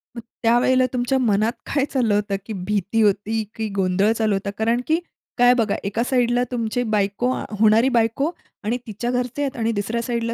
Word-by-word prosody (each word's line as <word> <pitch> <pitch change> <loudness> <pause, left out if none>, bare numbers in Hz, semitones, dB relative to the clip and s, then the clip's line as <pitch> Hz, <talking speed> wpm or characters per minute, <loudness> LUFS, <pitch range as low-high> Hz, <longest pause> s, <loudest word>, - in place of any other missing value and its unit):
मग 235 - -6 0.2
त्यावेळेला 250 +2 +4
तुमच्या 250 +2 +1
मनात 220 -1 +2 0.2
काय 280 -1 +2
चाललं 240 -7 +1
होतं? 205 -1 0
की 220 - -5 0.2
भीती 210 +2 0
होती 210 +2 +1
की 220 -1 -2
गोंधळ 195 +2 +2
चालू 215 -2 +2
होता? 200 +1 -3
कारण 230 +3 +1
की 320 +2 +2 0.4
काय 245 0 +6
बघा, 225 -5 +1
एका 210 +4 -1
साइडला 245 -1 +2
तुमची 240 0 -1
बायको, 205 +5 0 0.3
होणारी 220 +4 +5
बायको 230 +7 +1 0.3
आणि 230 +4 0
तिच्या 235 +3 -3
घरचे 250 +2 -2
आहेत 275 -1 -2
आणि 230 0 0
दुसऱ्या 220 +2 -2
साइडला 230 -1 -2
230 Hz, 180 wpm, -22 LUFS, 210-245 Hz, 0.4 s, काय